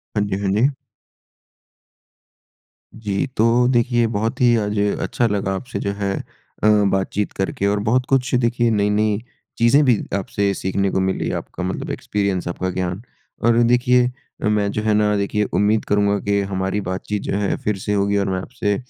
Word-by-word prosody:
हाँ 105 - +2
जी, 95 - -2
हाँ 100 -1 0
जी। 110 +6 +3 2.3
जी, 105 0 -2
तो 115 +2 +4
देखिए 120 -1 +2
बहुत 110 +1 -2
ही 120 -1 +5
आज 105 -1 -2 0.2
अच्छा 120 - 0
लगा 100 -2 -1
आपसे 125 +7 -5
जो 100 - -2
है 100 -1 -2
अ, - - -5 0.7
बातचीत 95 +1 -1
करके 95 +1 -1
और 100 +1 +1
बहुत 125 +3 +2
कुछ 130 -1 +1
देखिए 120 -1 +2
नई-नई 105 0 +1 0.4
चीज़ें 120 +6 +5
भी 125 -4 +4 0.2
आपसे 100 0 -1
सीखने 95 +1 -1
को - - 0
मिली, 95 0 -1
आपका 90 - -5
मतलब 90 - -3
एक्सपीरियंस 100 -3 -2
आपका 90 +2 -2
ज्ञान 90 +1 -3 0.4
और 120 0 +4
देखिए 125 +1 +3 0.4
मैं 105 -1 +1
जो 110 - -2
है 110 -1 +2
ना 105 0 +2
देखिए 100 +1 0
उम्मीद 105 +2 +2
करूँगा 100 0 +2
कि 100 0 +2
हमारी 95 +1 -2
बातचीत 95 +2 -3
जो - - -2
है, 100 -1 0
फिर 105 -2 -2
से 105 +2 -2
होगी 100 0 +1
और 100 -1 0
मैं 95 -1 -1
आपसे 105 -2 -2
105 Hz, 170 wpm, -21 LUFS, 100-115 Hz, 2.3 s, ही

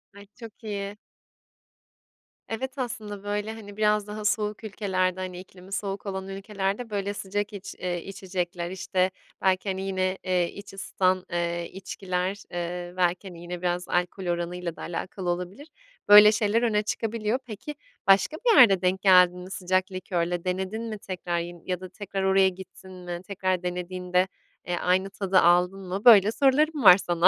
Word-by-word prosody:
Ay 200 0 -13
çok 230 0 -12
iyi. 205 -1 -4 1.5
Evet, 260 +5 -4
aslında 215 -5 -5
böyle, 205 +2 -2
hani, 205 -2 -11
biraz 210 -1 +2
daha 210 0 -6
soğuk 210 +1 0
ülkelerde, 185 -3 -1
hani, 185 -1 -5
iklimi 185 +1 -14
soğuk 195 +1 -3
olan 190 -1 -4
ülkelerde 195 +3 -3
böyle 200 -1 -2
sıcak 205 +2 -3
iç 195 -1 -8
eee, 175 -2 -3
içecekler, 180 -2 -4
işte, 190 0 0 0.3
belki, 190 +1 +1
hani 190 0 -2
yine, 190 -1 -1
eee, 180 -2 +1
iç 200 -1 -11
ısıtan, 185 -1 0
eee, 170 0 -2
içkiler, 190 +1 -3
eee, 175 0 -4
belki, 180 +2 +1
hani, 170 -2 -10
yine 175 0 -6
biraz 180 0 -1
alkol 180 +1 -1
oranıyla 175 0 -3
da - - -11
alakalı 180 +1 -4
olabilir. 180 - -4 0.4
Böyle 210 +1 +10
şeyler 215 +1 +1
öne 215 -3 +2
çıkabiliyor. 225 +2 -1
Peki, 235 +7 -7 0.3
başka 195 +11 +4
bir 455 -4 +4
yerde 195 -7 +7
denk 185 +1 +1
geldin 180 -2 +6
mi? 185 +1 -9
Sıcak 185 +1 0
likörle 175 -2 -2
denedin 190 +4 -2
mi 220 -2 -5
tekrar? 180 -3 -3
Yin 170 0 -7
ya 180 -1 -2
da 185 - -8
tekrar 195 0 -5
oraya 190 0 +4
gittin 190 0 -12
mi? 175 -1 -7
Tekrar 185 -2 -1
denediğinde, 180 +1 -1 0.4
eee, 175 - 0
aynı 185 +2 +1
tadı 195 -2 +2
aldın 180 +3 +4
mı? 195 +5 -4
Böyle 215 -3 +8
sorularım 285 +3 +2
var 180 -3 +10
sana. 175 -2 +3
190 Hz, 165 wpm, -26 LUFS, 180-205 Hz, 1.5 s, Böyle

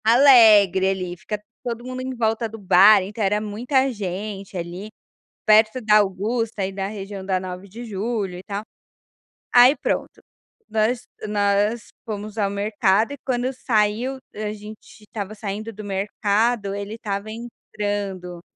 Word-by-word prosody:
Alegre 220 -6 +7
ali. 185 -2 -3
Fica 210 +2 -5 0.2
todo 235 -1 -4
mundo 255 0 -5
em 260 0 -4
volta 225 0 0
do 225 - -9
bar, 200 +1 +6
então 210 +3 -4
era 205 +2 +2
muita 245 +6 0
gente 200 -1 -5
ali 175 +4 -6 0.6
perto 215 +3 +5
da 215 -1 +5
Augusta, 215 +3 0
aí 190 0 -1
da 195 0 -3
região 200 -1 -7
da 190 -1 0
Nove 185 +1 -7
de 225 +5 -9
Julho 205 -3 -3
e 180 - -10
tal. 200 +1 -5 0.9
Aí, 250 +4 +7
pronto, - - -3 0.5
nós 220 +2 +1 0.3
nós 205 +2 +1 0.2
fomos 215 0 -6
ao 200 -2 +2
mercado 205 +2 +1
e, 285 - -7
quando 255 0 0
saiu, 235 +1 0 0.2
a 210 0 -3
gente 215 +1 -12
estava 210 -1 -6
saindo 215 +1 -5
do 215 0 -9
mercado, 205 +2 0
ele 200 +1 -5
estava 205 -3 -4
entrando, 205 -5 -5
210 Hz, 145 wpm, -22 LUFS, 195-225 Hz, 0.9 s, Alegre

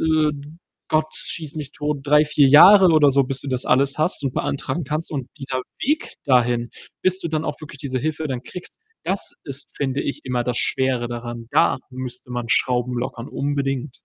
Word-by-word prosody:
äh, 155 -1 +3 0.6
Gott 155 0 +1
schieß 155 -4 -6
mich 145 -2 -6
tot, 150 -1 -3
3, 150 +1 +5
4 145 -1 +4
Jahre 185 +7 +9
oder 150 -3 +6
so, 135 0 +3
bis 135 0 -3
du - - -6
das 130 -1 -1
alles 135 +2 +2
hast 155 +1 +1
und 130 - -2
beantragen 140 +3 -2
kannst 150 +4 -3
und 135 -4 -4
dieser 130 -2 -3 0.2
Weg 300 +4 0
dahin, 120 -2 +2 0.3
bis 185 0 +2
du - - -3
dann 155 0 -1
auch 145 - -3
wirklich 150 -2 -10
diese 130 -3 -3
Hilfe 155 +3 -2
dann 125 -2 -3
kriegst, 180 - -10 0.3
das 190 +2 -1
ist, 140 -1 -5
finde 140 0 -1
ich, 140 - -4
immer 125 -2 -1
das 125 -1 -1
Schwere 130 -2 0
daran. 120 -1 -6
Da - - +3
müsste 125 -1 -7
man 120 -1 -3
Schrauben 125 +1 +1
lockern, 120 0 -5
unbedingt. 140 -1 -2
140 Hz, 190 wpm, -22 LUFS, 125-155 Hz, 0.6 s, Jahre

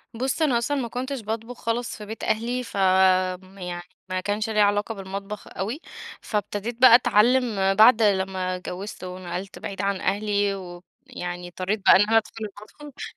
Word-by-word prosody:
بُص، 260 +6 -2
أنا 265 -6 +3
أصلًا 280 +5 -1
ما 235 - -3
كنتش 255 +2 -4
باطبخ 225 +3 -5
خالص 230 +1 -3
في 210 - -9
بيت 220 +2 -8
أهلي 240 +3 -1
فآمم، 185 -1 +2
يعني 175 -1 -6 0.3
ما 185 - -1
كانش 210 +3 -2
ليَّ 215 -1 0
علاقة 205 +2 +1
بالمطبخ 195 +2 -7
أوي، 225 - -4 0.4
فابتديت 210 +2 -3
بقى 245 -2 +10
أتعلم 225 -4 +3
بعد 225 +2 +7
لمّا 190 -2 +1
اتجوزت 185 +2 -7
ونقلت 180 +1 -6
بعيد 195 0 -5
عن 200 -1 -1
أهلي 205 -1 0
ويعني 175 -1 -8
إِضطريت 185 +4 -3
بقى - - +8
إن 190 - +6
أنا 225 +2 +3
أدخل 220 0 -2 0.3
المطبخ، 290 -2 -10
205 Hz, 160 wpm, -24 LUFS, 190-230 Hz, 0.4 s, بقى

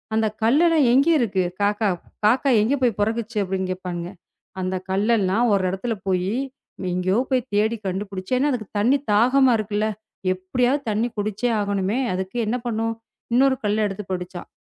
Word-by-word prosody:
"அந்தக் 220 -1 0
கல்லு 275 +9 +4
எல்லாம் 315 -6 +4
எங்க 275 +4 +4
இருக்கு? 195 -6 +1 0.2
காக்கா 205 +1 +2 0.4
காக்கா 255 +5 +3
எங்க 235 +7 +2
போய் 235 -5 +2
பொறக்குச்சு?" 225 +1 -1
அப்படின்னு 190 0 -2
கேப்பானுங்க. 180 -1 -5 0.5
"அந்தக் 185 0 -3
கல்ல 210 +5 +2
எல்லாம் 205 +6 +2
ஒரு 195 -2 +2
இடத்துல 225 +5 -2
போயி, 185 +1 0 0.6
எங்கயோ 185 +2 +1
போய்த் 255 -1 0
தேடி 220 +3 +2
கண்டுபிடிச்சு 190 +2 -4
ஏன்னா, 285 +3 +2
அதுக்குத் 215 -5 -4
தண்ணி 245 +7 +4 0.2
தாகமா 255 +4 +4
இருக்குல்ல. 215 0 -1 0.5
எப்படியாவது 245 +9 0
தண்ணி 220 +3 +1
குடிச்சே 215 +3 -1
ஆகணுமே, 200 +3 -1
அதுக்கு 190 +5 -4
என்ன 235 +4 0
பண்ணும்? 225 0 -1 0.4
இன்னொரு 265 +2 +4
கல்லு 210 +1 +1
எடுத்துப் 195 0 -7
போட்டுச்சாம். 180 -1 -5
210 Hz, 155 wpm, -23 LUFS, 190-240 Hz, 0.6 s, கல்லு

